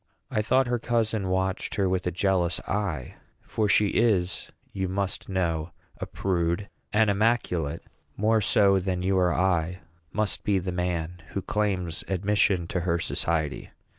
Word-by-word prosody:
I 110 - +1
thought 130 +5 +3
her 120 0 0
cousin 110 -4 0
watched 95 +1 -1
her 100 -2 +2
with 90 -1 0
a - - +1
jealous 90 -1 +1
eye; 90 -11 -3 0.3
for 105 -2 -1
she 105 +1 +4
is, 100 -6 +1 0.2
you 95 -1 -1
must 95 0 -2
know, 85 -4 -1 0.3
a - - -4
prude; 90 +1 -1 0.2
and 110 +1 +4
immaculate 100 -7 +1 0.3
more 110 +2 +3
so 100 -1 +4
than 90 -1 -2
you 95 +1 +2
or 90 -1 +3
I 90 -1 +1 0.3
must 105 -2 -1
be 100 -2 +2
the 90 0 -2
man 90 -1 -2
who 100 - -2
claims 95 -6 -1
admission 95 -1 +2
to 90 - -1
her 85 -1 +1
society. 80 -2 -1
95 Hz, 155 wpm, -27 LUFS, 90-105 Hz, 0.3 s, she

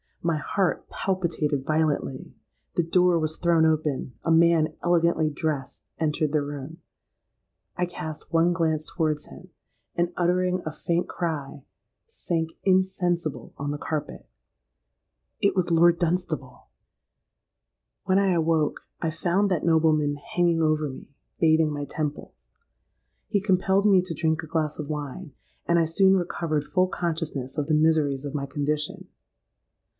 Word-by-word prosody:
My 165 -2 +1
heart 185 +3 -1
palpitated 160 -7 -1
violently! 155 -4 -1 0.4
The 175 - +2
door 180 +1 +3
was 155 0 -2
thrown 170 -2 +3
open;—a 150 -4 -1
man 165 -1 +4
elegantly 170 -2 +2
dressed 145 -2 -4
entered 155 -1 0
the 150 -1 +1
room;—I 145 +4 -9
cast 160 -3 -7
one 165 +1 +3
glance 160 -3 0
towards 155 -3 -1
him, 185 - -13 0.5
and, 175 0 0
uttering 180 +1 +1
a 155 - -2
faint 170 +3 -1
cry, 150 -5 -4 0.4
sank 165 - -2
insensible 175 - 0
on 145 0 -3
the 145 - -3
carpet. 150 -1 -4 1.1
It 200 -1 +2
was 180 -2 0
Lord 170 +1 +5
Dunstable! 180 +1 -2 1.4
"When 190 0 +3
I 195 -1 +3
awoke, 160 -3 +1 0.2
I 165 - 0
found 180 +5 +1
that 180 -5 0
nobleman 155 -3 +3
hanging 170 +2 0
over 155 -1 +1
me, 130 - -10 0.3
bathing 160 -1 +4
my 145 -1 -3
temples. 145 - -5 0.8
He 205 -2 +1
compelled 190 0 +2
me 195 -3 +6
to 175 -3 -5
drink 160 +1 0
a - - -8
glass 155 -1 -1
of 150 - -4
wine; 150 +2 -5 0.3
and 170 - +3
I 165 - +4
soon 190 +4 +4
recovered 170 -4 -1
full 185 +4 +1
consciousness 160 -7 -3
of 145 -1 -1
the 155 - +2
miseries 150 -3 +2
of 145 +1 -5
my 140 -1 -2
condition. 150 +2 -2
160 Hz, 135 wpm, -25 LUFS, 150-175 Hz, 1.4 s, me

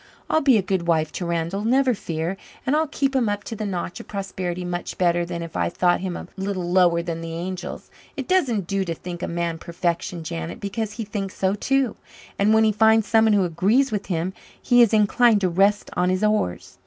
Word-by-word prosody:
I'll 315 - +3
be 270 -5 +5
a 200 - +1
good 185 -2 -1
wife 160 -2 +2
to 175 - -4
Randall, 170 +4 -2
never 255 +3 +3
fear, 165 -2 -3 0.3
and 270 - +2
I'll 315 +1 +2
keep 275 -1 -1
him 240 -5 +2
up 205 0 -2
to 225 - -6
the 215 -1 -3
notch 180 -2 -4
of - - -10
prosperity 185 -3 -4
much 175 0 -4
better 175 -1 +2
than 170 -1 -5
if 165 - -9
I - - +1
thought 175 +1 +2
him 185 -2 -4
a - - -8
little 190 -2 -3
lower 175 -2 +4
than 165 -1 -4
the 165 0 -6
angels. 180 +2 -6 0.3
It - - -4
doesn't 260 - +1
do 195 +2 -1
to 165 -2 -3
think 175 +1 -7
a - - -2
man 170 -1 -2
perfection, 170 0 -3
Janet, 80 - -5
because 205 +1 -3
he 225 - -4
thinks 200 -2 -4
so 190 0 +1
too, 265 +3 0 0.4
and 200 +2 +4
when 220 0 +5
he 220 - +4
finds 220 +1 +4
someone 220 -1 +4
who 200 -2 +3
agrees 205 +11 +2
with 205 -2 -3
him 180 +1 -2 0.3
he 245 0 +4
is 235 - +5
inclined 220 +1 +4
to 185 - +2
rest 200 +4 +2
on 180 0 +2
his 185 +2 0
oars." 95 - -1
190 Hz, 225 wpm, -23 LUFS, 170-220 Hz, 0.4 s, be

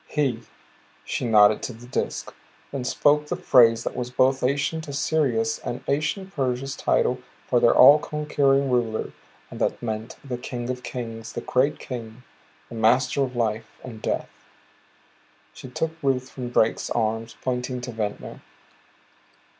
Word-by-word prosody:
"He" 135 -6 0 0.6
she - - -2
nodded 105 -2 +5
to 125 - -4
the 115 +2 -13
Disk, 125 - -3 0.4
then 140 -2 -3
spoke 150 +3 +2
the 175 - -2
phrase 120 -10 +5
that - - -4
was 125 -1 -3
both 130 +1 +2
ancient 145 +5 -1
Assyria's 140 -6 0
and 120 - -5
ancient 190 +7 -1
Persia's 135 -2 -2
title 125 +1 +1 0.3
for 120 - +2
their 120 - +4
all 145 +4 +9
conquering 140 -3 +1
rulers, 115 -3 0 0.4
and - - -8
that - - 0
meant 110 -1 -4
"the 125 -3 -5
King 125 0 -4
of 125 0 -6
Kings. 115 -3 -6
The - - -4
Great 130 +3 +1
King, 120 -1 -8 0.5
Master 125 +4 +2
of 130 -2 -1
Life 110 -1 -2
and 115 -4 -9
Death." - - -2 1.2
She 130 - -10
took 160 +5 -2
Ruth 130 -2 0
from 125 -2 -6
Drake's 115 -2 +1
arms, 115 0 -1
pointing 125 0 -2
to 125 0 -5
Ventnor. 105 -2 -5
125 Hz, 145 wpm, -24 LUFS, 115-140 Hz, 1.2 s, all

